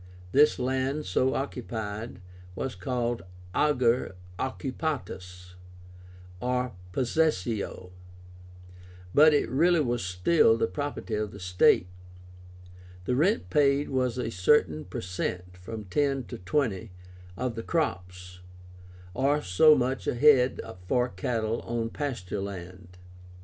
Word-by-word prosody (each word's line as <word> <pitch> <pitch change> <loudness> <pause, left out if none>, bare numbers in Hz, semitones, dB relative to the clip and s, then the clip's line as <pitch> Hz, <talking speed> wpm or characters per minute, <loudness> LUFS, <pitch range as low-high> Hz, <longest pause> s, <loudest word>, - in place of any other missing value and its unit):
This 145 +7 +5
land, 130 +3 -1
so 130 +9 +1
occupied, 110 -6 -5 0.3
was 130 +6 -3
called 120 -3 -2 0.3
AGER 125 -8 +2 0.2
OCCUPÁTUS, 95 - -4 0.9
or 125 +1 -1 0.2
possessio; 115 - -1 1.2
but 155 +2 +7
it 145 - +2
really 170 +6 +3
was 120 -7 0
still 95 - +3
the 115 - +2
property 120 +3 -4
of 105 0 -1
the 100 - -11
state. 90 -1 +3 1.2
The 125 - 0
rent 190 - +1
paid 145 -1 +3
was 130 -2 0
a 120 -2 -2
certain 90 - +2
per 90 - -6
cent 90 0 -4
(from 105 +4 -7
10 135 +7 0
to - - -9
20) 110 0 -1 0.5
of 125 -2 -2
the 115 - -5
crops, 90 - -3 0.7
or 145 +5 +1
so 150 - +6
much 130 0 -1
a - - 0
head 130 -1 +5 0.3
for 125 +2 +2
cattle 110 +3 -2
on 115 -1 -3
pasture 115 - -4
land. 90 -2 -8
120 Hz, 115 wpm, -28 LUFS, 95-135 Hz, 1.2 s, but